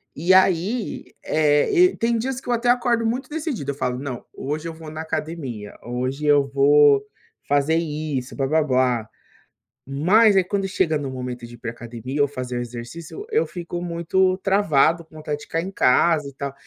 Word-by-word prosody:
E 170 +5 +1
aí, 190 +5 +2 0.2
eh, 150 -1 +2
e 365 +1 +4
tem 230 0 +1
dias 255 +2 -2
que - - -17
eu 245 - +3
até 240 +1 0
acordo 240 -1 +2
muito 245 +4 -1
decidido, 295 - -3
eu - - -8
falo: 125 -3 -2
"Não, 130 -2 -6
hoje 150 +4 -4
eu 165 - -5
vou 160 -1 -10
na 155 +1 -5
academia, 145 -10 -5
hoje 130 +4 -3
eu 145 -1 +5
vou 140 0 +5 0.4
fazer 145 +3 +2
isso, 150 -5 -3
blá-blá-blá". 130 -5 +1 0.8
Mas 195 +10 +4
aí 190 - +5
quando 195 +1 -2
chega 175 -5 +1
no 140 -2 -5
momento 125 -2 -6
de 120 - -12
ir - - -15
pra 115 0 -5
academia 120 +4 -5
ou 145 - +4
fazer 125 -3 -5
o - - -1
exercício, 120 - -8
eu 450 +1 +2
eu - - -6
fico 175 0 -6
muito 180 +2 +1
travado, 170 -5 +2
com 155 - -21
vontade 150 -1 -4
de 150 - -11
ficar 165 - -2
em 185 - -5
casa 150 -1 +3
e - - -16
tal. 140 0 -5
155 Hz, 190 wpm, -22 LUFS, 135-185 Hz, 0.8 s, eu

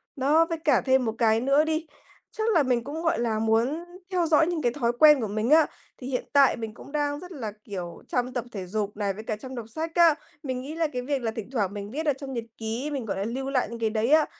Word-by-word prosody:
Đó, 295 +4 +4
với 330 - -1
cả 300 -5 +3
thêm 260 -1 +3
1 220 -1 -2
cái 225 -2 +3
nữa 275 +4 +4
đi, 315 +1 -1 0.5
chắc 435 - -4
là 325 -5 +5
mình 250 -3 +1
cũng, 295 +5 -5
gọi 325 -8 +1
là, 225 -2 0
muốn 230 +9 +1 0.3
theo 360 -2 +2
dõi 320 0 +4
những 345 -3 -1
cái 240 -3 +2
thói 235 -4 +1
quen 300 -3 +8
của 220 - -1
mình 215 +3 -1
á. 315 +1 +7 0.3
Thì 255 - -8
hiện 255 -2 -2
tại 280 -2 +6
mình 225 -2 -5
cũng 260 - -13
đang 290 -1 -1
rất 360 +2 -10
là, 240 - -5
kiểu, 180 -4 -7
chăm 250 0 -1
tập 245 -2 -2
thể 195 -5 -5
dục 205 +2 -3
này, 200 -2 0
với 215 +3 -8
cả 220 - -2
chăm 260 +5 -9
đọc 235 -3 -5
sách 320 +7 -4
á. 340 -3 +6 0.3
Mình 260 -3 -3
nghĩ 290 +4 -7
là 330 -1 +1
cái 250 - -2
việc 275 +1 -2
là 225 -2 -1
thỉnh 220 -1 -7
thoảng 205 -7 0
mình 205 0 -6
viết 310 +5 -3
ở 295 - +3
trong 270 0 -7
nhật 235 -2 -3
ký, 230 +6 -3
mình, 270 -5 -3
gọi 200 - -3
là, 195 - -1
lưu 260 +5 -3
lại 265 -2 +1
những 235 0 -7
cái 225 -1 +1
đấy 220 +2 0
á, 310 0 +6
255 Hz, 280 wpm, -26 LUFS, 225-300 Hz, 0.5 s, quen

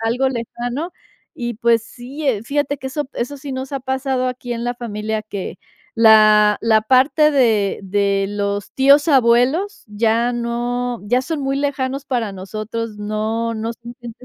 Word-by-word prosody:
algo 240 +4 +1
lejano, 245 +5 -4 0.5
y, 240 -1 -3
pues, 230 0 +2
sí, 265 +7 -8
eh, 225 -6 +1
fíjate 285 +2 -1
que 265 - -7
eso 280 +1 -4
eso 270 +4 -4
sí 275 0 -7
nos 260 +1 -5
ha 275 - -1
pasado 265 0 -1
aquí 250 -1 -4
en 235 0 -4
la 245 0 -1
familia, 220 -2 -4
que 195 -4 -6 0.4
la 215 -2 +6
la 220 -1 +3
parte 270 +6 +4
de 225 -8 +2
de 200 0 +1
los 205 0 -3
tíos 280 +3 +5
abuelos, 270 - +2
ya 225 +3 +1
no 240 0 -2
ya 250 +4 +2
son 315 +1 -3
muy 275 0 -1
lejanos 275 -1 -2
para 235 -6 -2
nosotros, 215 +3 -5
no 220 +2 -2
no 225 +1 -3
son 235 +1 -11
gente 240 +1 -10
240 Hz, 165 wpm, -19 LUFS, 220-265 Hz, 0.5 s, la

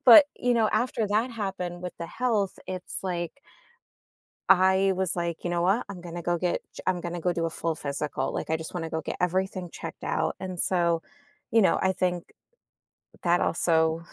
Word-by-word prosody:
but, 255 +4 +11
you 245 0 +1
know, 225 -2 +3
after 225 0 +1
that 220 +5 +1
happened 190 -5 -4
with 180 - -4
the 170 - -4
health, 215 -3 0
it's 185 -1 -2
like 175 -3 -2 1.2
I 190 +1 +5
was 190 -2 +3
like, 170 -1 -3
"You 175 - -1
know 175 0 +1
what, 195 +7 +2
I'm 195 -3 -7
gonna 175 0 -7
go 175 +1 +1
get 175 0 0
ch - - -9
I'm 185 -1 +1
gonna 175 0 -4
go 180 +2 +1
do 170 -1 -1
a - - -3
full 165 0 -2
physical," 140 -2 -2
like, - - -3
"I 160 - +3
just 160 +2 -7
want 175 - -2
to 160 - -5
go 160 - -1
get - - -5
everything 185 0 -1
checked - - -8
out." - - 0
And 185 -1 -5
so, 170 -2 +2 0.5
you 225 0 +5
know, 190 - +4
I 190 - +2
think 180 -2 -2 0.9
that 175 0 +3
also 160 -1 +2
180 Hz, 200 wpm, -27 LUFS, 170-190 Hz, 1.2 s, but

